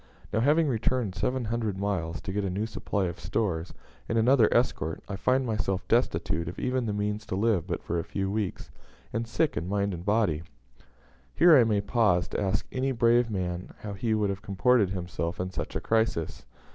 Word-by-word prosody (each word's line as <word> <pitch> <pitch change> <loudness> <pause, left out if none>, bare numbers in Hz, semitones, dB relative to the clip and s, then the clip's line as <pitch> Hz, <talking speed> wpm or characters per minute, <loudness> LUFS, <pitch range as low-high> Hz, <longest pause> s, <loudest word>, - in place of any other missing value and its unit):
Now, 110 - +2
having 150 +6 +3
returned 120 -4 0
seven 125 +7 -1
hundred 110 -3 -2
miles 90 -4 -2
to 95 - -5
get 105 0 -1
a 95 - -1
new 100 +4 -1
supply 105 -3 -2
of 85 - -4
stores, 90 -2 -2 0.4
and 115 - +1
another 115 0 +5
escort, 80 -10 0
I 100 - -4
find 130 +7 +1
myself 95 -5 -1
destitute 85 - +1
of 90 - -9
even 125 -2 -1
the - - 0
means 105 +1 -2
to - - -2
live 100 -4 +1
but 85 - -3
for 85 - -1
a - - -2
few 95 -1 -3
weeks, 105 -2 -3 0.4
and 115 +1 -2
sick 150 +6 0
in 85 +4 -3
mind 100 0 0
and 85 -1 -6
body." 100 -7 +1 0.9
Here 170 -2 +7
I 125 -4 +6
may 105 -2 +2
pause 100 -5 +2
to - - -2
ask 95 0 0
any 135 +1 0
brave 120 -1 +3
man 90 -3 -4
how 105 -1 -5
he 110 +3 0
would 105 -2 +1
have 95 -1 -5
comported 105 +1 +2
himself 90 -2 -4
in 90 +1 -2
such - - -5
a - - 0
crisis. 110 -8 -1
105 Hz, 200 wpm, -28 LUFS, 95-115 Hz, 0.9 s, Here